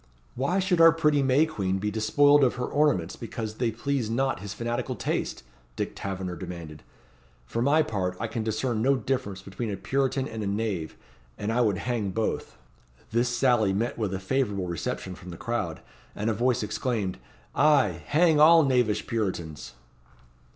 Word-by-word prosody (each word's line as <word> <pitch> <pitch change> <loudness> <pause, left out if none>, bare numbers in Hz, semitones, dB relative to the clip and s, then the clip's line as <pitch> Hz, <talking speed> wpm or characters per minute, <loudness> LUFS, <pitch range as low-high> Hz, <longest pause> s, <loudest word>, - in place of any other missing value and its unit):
"Why 140 +9 0
should 185 -3 +2
our 165 0 +9
pretty 150 -3 +2
May 135 +3 +4
Queen 95 -12 -2
be 105 +2 -2
despoiled 145 +7 +4
of 125 - +3
her 125 0 -2
ornaments 145 - +1
because 110 -2 -6
they 120 -2 +1
please 120 +1 -2
not 130 +3 0
his 100 0 -7
fanatical 120 +2 -3
taste?" - - -3 0.3
Dick - - -2
Taverner 95 -2 -4
demanded. 80 -3 -8 0.6
"For 115 - -3
my 145 +5 +4
part 95 -9 -2
I 115 - -2
can 110 0 -3
discern 110 +1 -1
no 135 +4 +4
difference 110 -6 -3
between 105 +4 -5
a 100 - -3
Puritan 135 +4 0
and 110 -1 -6
a 105 - -2
knave, 100 -5 -2 0.4
and 105 +2 -2
I 125 - +2
would 105 -5 +2
hang 110 -1 -2
both." 100 - -3 0.5
This 120 +2 +2
sally 120 -5 +2
met 115 +5 -1
with 105 -5 -2
a 95 - -3
favourable 100 -2 -1
reception 90 +2 -4
from 90 0 -11
the 85 - -8
crowd, 105 -9 -3 0.3
and 110 +2 -1
a - - 0
voice 125 +2 +1
exclaimed 105 - -2 0.3
"Ay, 135 - +3
hang 160 0 +4
all 165 +2 +8
knavish 125 -6 +1
Puritans." 90 -9 -3
115 Hz, 170 wpm, -27 LUFS, 100-135 Hz, 0.6 s, our